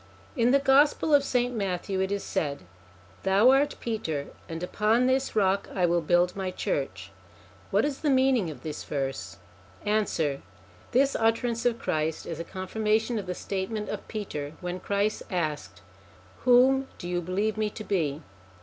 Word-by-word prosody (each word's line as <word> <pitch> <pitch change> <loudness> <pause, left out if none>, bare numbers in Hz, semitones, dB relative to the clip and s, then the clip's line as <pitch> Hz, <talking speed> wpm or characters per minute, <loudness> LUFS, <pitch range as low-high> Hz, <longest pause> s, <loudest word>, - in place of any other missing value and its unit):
In 240 -3 +3
the 275 - +6
Gospel 280 +3 +4
of 285 -1 +6
St. 250 -2 0
Matthew 195 -2 -2
it 190 +1 0
is 200 0 -1
said: 145 - -2 0.6
'Thou 200 +6 +5
art 285 +2 +3
Peter, 160 -11 -3 0.2
and 165 +1 -5
upon 220 +6 +2
this 260 0 +1
rock 195 -1 +2
I 180 -2 +3
will 170 0 +2
build 175 +2 +2
my 190 -1 -2
church.' - - -3 0.6
What - - +2
is 290 -2 -2
the 300 - 0
meaning 260 -8 +3
of 140 -5 -9
this 155 -2 -5
verse? 135 - -4 0.5
Answer. 180 -9 0 0.5
This 275 +3 +3
utterance 230 +1 +1
of 235 -1 0
Christ 160 -6 -2
is 165 -2 -5
a - - -2
confirmation 215 +5 -1
of 195 - -7
the 180 - -3
statement 200 +3 -3
of - - -5
Peter, 150 -9 -5
when 180 0 -4
Christ 200 +3 0
asked: 155 -5 -3 0.6
Whom 260 +2 +5
do 175 - -7
you 175 0 -1
believe 195 +5 -1
me 215 -1 0
to 215 - -8
be? 160 -7 -1
200 Hz, 165 wpm, -27 LUFS, 175-240 Hz, 0.6 s, the